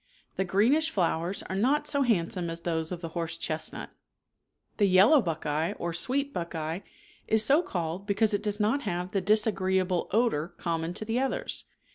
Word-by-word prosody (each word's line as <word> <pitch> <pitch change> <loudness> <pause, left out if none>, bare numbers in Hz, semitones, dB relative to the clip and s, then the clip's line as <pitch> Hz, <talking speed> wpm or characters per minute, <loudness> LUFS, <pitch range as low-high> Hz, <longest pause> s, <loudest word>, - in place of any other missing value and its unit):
The 190 - 0
greenish 245 - +3
flowers 175 - -1
are 190 - -5
not 270 +9 +2
so 285 -1 +1
handsome 180 -7 0
as 165 0 -5
those 160 -1 -2
of 175 -1 -5
the 165 - -5
horse 170 0 -3
chestnut. 160 -1 -4 0.9
The 205 - +4
yellow 195 +10 +6
buckeye 160 -3 -2
or 170 0 -4
sweet 275 +11 -1
buckeye 165 -1 -3 0.5
is 220 0 +5
so 290 +8 +5
called 175 - -4
be 200 - 0
cause 215 +1 +2
it 205 - 0
does 210 0 -1
not 225 +7 +1
have 180 -4 -3
the 195 - 0
disagreeable 190 -3 +1
odor 210 -8 +1
common 165 0 -2
to 215 - -5
the 225 +3 0
others. 270 0 -1
190 Hz, 175 wpm, -28 LUFS, 170-220 Hz, 0.9 s, yellow